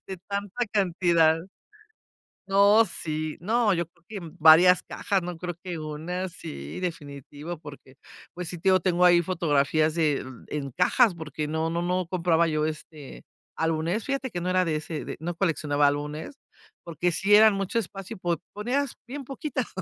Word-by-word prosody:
de 190 Hz, -, -6 dB
tanta 200 Hz, +4 st, -2 dB
cantidad. 170 Hz, -5 st, +3 dB, 1.1 s
No, 200 Hz, +3 st, +5 dB
sí 155 Hz, -5 st, -4 dB
no 220 Hz, +3 st, +2 dB
yo 170 Hz, 0 st, -1 dB
creo 170 Hz, 0 st, -33 dB
que 210 Hz, -, -5 dB, 0.2 s
varias 165 Hz, +3 st, +7 dB
cajas, 195 Hz, -2 st, -1 dB
no 175 Hz, -1 st, -5 dB
creo 175 Hz, 0 st, -5 dB
que 175 Hz, -3 st, -5 dB
una, 160 Hz, +5 st, -4 dB
sí, 70 Hz, -, -8 dB
definitivo, 150 Hz, -1 st, -6 dB
porque, 140 Hz, -3 st, -13 dB, 0.4 s
pues 175 Hz, -1 st, -5 dB
sí, 175 Hz, -, -6 dB
te 180 Hz, -, -4 dB
digo, 185 Hz, -1 st, +4 dB
tengo 180 Hz, -1 st, +3 dB
ahí 175 Hz, -1 st, +6 dB
fotografías 155 Hz, -3 st, +1 dB
de 155 Hz, -5 st, +1 dB, 0.2 s
en 140 Hz, -3 st, -4 dB
cajas, 190 Hz, +2 st, +3 dB
porque 155 Hz, -2 st, -5 dB
no 160 Hz, +1 st, -1 dB
no 170 Hz, +1 st, -1 dB
no 180 Hz, +1 st, 0 dB
compraba 170 Hz, -2 st, +2 dB
yo, 155 Hz, 0 st, 0 dB
este, 155 Hz, -2 st, -7 dB, 0.3 s
álbumes, 165 Hz, +6 st, 0 dB
fíjate 275 Hz, -1 st, -2 dB
que 175 Hz, -4 st, -5 dB
no 180 Hz, -, -2 dB
era 185 Hz, 0 st, +2 dB
de 160 Hz, -, 0 dB
ese, 155 Hz, 0 st, -5 dB
no 175 Hz, +1 st, -3 dB
coleccionaba 150 Hz, -5 st, +1 dB
álbumes, 150 Hz, -, -3 dB, 0.5 s
porque 170 Hz, +1 st, -1 dB
sí 195 Hz, +5 st, +2 dB
eran 215 Hz, 0 st, +8 dB
mucho 195 Hz, +3 st, -1 dB
espacio, 195 Hz, -2 st, -7 dB
po 175 Hz, -2 st, 0 dB, 0.2 s
ponías 250 Hz, +6 st, -1 dB
bien 275 Hz, +2 st, -6 dB
poquitas, 270 Hz, 0 st, -4 dB
175 Hz, 165 wpm, -26 LUFS, 155-195 Hz, 1.1 s, eran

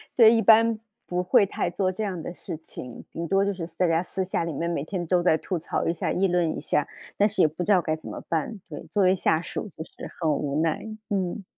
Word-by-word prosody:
对， 230 Hz, -2 st, +8 dB
一 225 Hz, -, +3 dB
般 225 Hz, +1 st, +5 dB, 0.3 s
不 180 Hz, 0 st, -1 dB
会 195 Hz, +2 st, +5 dB
太 185 Hz, -, -2 dB
做 185 Hz, +1 st, 0 dB
这 200 Hz, +4 st, -4 dB
样 185 Hz, -5 st, -3 dB
的 175 Hz, -, -5 dB
事 160 Hz, -, -7 dB
情， 125 Hz, -6 st, -9 dB
顶 170 Hz, 0 st, -4 dB
多 195 Hz, +2 st, +3 dB
就 200 Hz, -, 0 dB
是 170 Hz, -3 st, -5 dB
大 180 Hz, -, +3 dB
家 165 Hz, +1 st, +2 dB
私 190 Hz, +1 st, -2 dB
下 180 Hz, -2 st, -1 dB
里 165 Hz, -2 st, -3 dB
面 170 Hz, +4 st, -2 dB
每 160 Hz, -4 st, -1 dB
天 175 Hz, +1 st, -3 dB
都 180 Hz, 0 st, +3 dB
在 160 Hz, -3 st, +4 dB
吐 180 Hz, +1 st, -3 dB
槽 165 Hz, -, -2 dB
一 165 Hz, -, +1 dB
下， 165 Hz, -, -2 dB
议 195 Hz, +1 st, +2 dB
论 175 Hz, -3 st, +1 dB
一 -, -, -3 dB
下， 150 Hz, -, 0 dB, 0.3 s
但 205 Hz, -, +5 dB
是 205 Hz, -2 st, 0 dB
也 -, -, +6 dB
不 160 Hz, +4 st, -4 dB
知 210 Hz, -, +1 dB
道 185 Hz, -3 st, +5 dB
该 155 Hz, -1 st, -1 dB
怎 155 Hz, -, -10 dB
么 -, -, -6 dB
办。 170 Hz, +6 st, -1 dB
对， 150 Hz, -, -7 dB
作 205 Hz, -2 st, +2 dB
为 185 Hz, +1 st, +5 dB
下 160 Hz, -3 st, +2 dB
属 205 Hz, -, -5 dB
就 160 Hz, -, -4 dB
是 -, -, -18 dB, 0.3 s
很 160 Hz, -3 st, +2 dB
无 145 Hz, +1 st, 0 dB
奈， 165 Hz, -1 st, +1 dB, 0.3 s
嗯。 195 Hz, 0 st, -1 dB
180 Hz, 285 characters per minute, -26 LUFS, 165-195 Hz, 0.3 s, 对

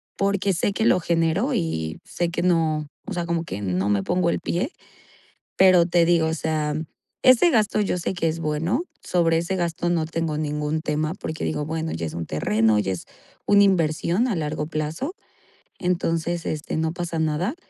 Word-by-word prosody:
Porque 200 Hz, -1 st, +1 dB
sé 190 Hz, +4 st, 0 dB
que 220 Hz, +3 st, -1 dB
lo 185 Hz, -, +4 dB
genero, 170 Hz, -, +1 dB
y 80 Hz, -, -2 dB
sé 175 Hz, -1 st, -2 dB
que 175 Hz, -, -2 dB
no, 160 Hz, -4 st, +1 dB, 0.2 s
o -, -, -6 dB
sea, 175 Hz, -1 st, -2 dB
como 170 Hz, 0 st, -1 dB
que 100 Hz, -, -6 dB
no 95 Hz, +1 st, 0 dB
me 100 Hz, -1 st, +1 dB
pongo 175 Hz, -, +1 dB
el -, -, 0 dB
pie. 190 Hz, -, -2 dB, 0.9 s
Pero 185 Hz, -3 st, +6 dB
te 170 Hz, -1 st, +3 dB
digo, 165 Hz, -2 st, +3 dB
o 160 Hz, -, -1 dB
sea, 155 Hz, -2 st, -1 dB, 0.5 s
ese 255 Hz, +6 st, +6 dB
gasto, 215 Hz, -4 st, +2 dB
yo 195 Hz, -, 0 dB
sé 175 Hz, +2 st, -2 dB
que 165 Hz, -2 st, 0 dB
es 165 Hz, +1 st, -3 dB
bueno 165 Hz, -, 0 dB, 0.2 s
sobre 165 Hz, -2 st, +2 dB
ese 185 Hz, +3 st, -2 dB
gasto, 175 Hz, 0 st, -1 dB
no 165 Hz, -2 st, +1 dB
tengo 165 Hz, -1 st, -2 dB
ningún 150 Hz, 0 st, -1 dB
tema, 155 Hz, +1 st, -1 dB
porque 155 Hz, -, -5 dB
digo: 150 Hz, -1 st, -1 dB
"Bueno, 160 Hz, 0 st, -3 dB
ya 80 Hz, 0 st, -3 dB
es 80 Hz, -, -5 dB
un 85 Hz, -, -4 dB
terreno 105 Hz, +8 st, +2 dB
ya 95 Hz, -2 st, 0 dB
es 90 Hz, -, -6 dB, 0.4 s
una 200 Hz, 0 st, +6 dB
inversión 175 Hz, +4 st, +2 dB
a 205 Hz, -, 0 dB
largo 150 Hz, -1 st, -2 dB
plazo". 160 Hz, -, -3 dB, 0.6 s
Entonces, 170 Hz, -2 st, -1 dB
este, 155 Hz, 0 st, -3 dB
no 160 Hz, +1 st, 0 dB
pasa 175 Hz, -2 st, -3 dB
nada. 160 Hz, -, 0 dB
165 Hz, 190 wpm, -24 LUFS, 155-180 Hz, 0.9 s, Pero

